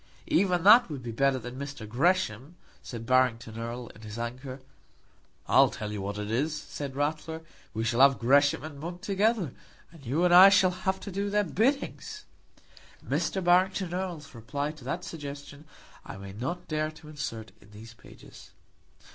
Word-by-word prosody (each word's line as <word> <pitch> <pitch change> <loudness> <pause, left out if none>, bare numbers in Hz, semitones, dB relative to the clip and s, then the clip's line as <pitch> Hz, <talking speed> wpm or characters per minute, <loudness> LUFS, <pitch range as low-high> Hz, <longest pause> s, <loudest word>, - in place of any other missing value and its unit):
"Even 195 - +2
that 220 +3 +7
would 140 -5 -6
be 120 - -5
better 135 +3 +2
than 125 +1 -8 0.3
Gresham," 140 - 0 0.3
said 115 -2 -8
Barrington 120 -3 +2
Erle, 120 +1 -5
in 110 - -15
his 110 0 -8
anger. 130 +3 -6 0.9
"I'll - - +6
tell 105 -1 -6
you 105 -1 -4
what 100 +1 -4
it 105 0 -4
is," 150 +7 0
said 140 -2 -7
Ratler, 155 +3 -2 0.3
"we 110 - -1
shall 115 +2 +1
have 135 0 +6
Gresham 140 +4 +3
and 150 -2 -8
Monk 175 +3 -7
together, 200 - +1 0.4
and 165 -4 -16
you 145 +8 0
and 175 - +4
I 185 +2 +10
shall 190 -2 +4
have 190 +1 -2
to 200 - -7
do 200 +2 -2
their 210 +1 +2
biddings." 275 - -1 0.8
Mr. 190 - -1
Barrington 180 +1 +2
Erle's 175 -6 -5
reply 135 +6 -4
to 155 -4 -15
that 165 +7 -3
suggestion 145 -1 -8 0.4
I - - -9
may 95 0 -9
not 130 - -5
dare 155 0 -1
to 155 0 -14
insert 115 -7 -6
in 100 - -19
these 110 +2 -12
pages. 115 - -15
145 Hz, 170 wpm, -28 LUFS, 120-180 Hz, 0.9 s, I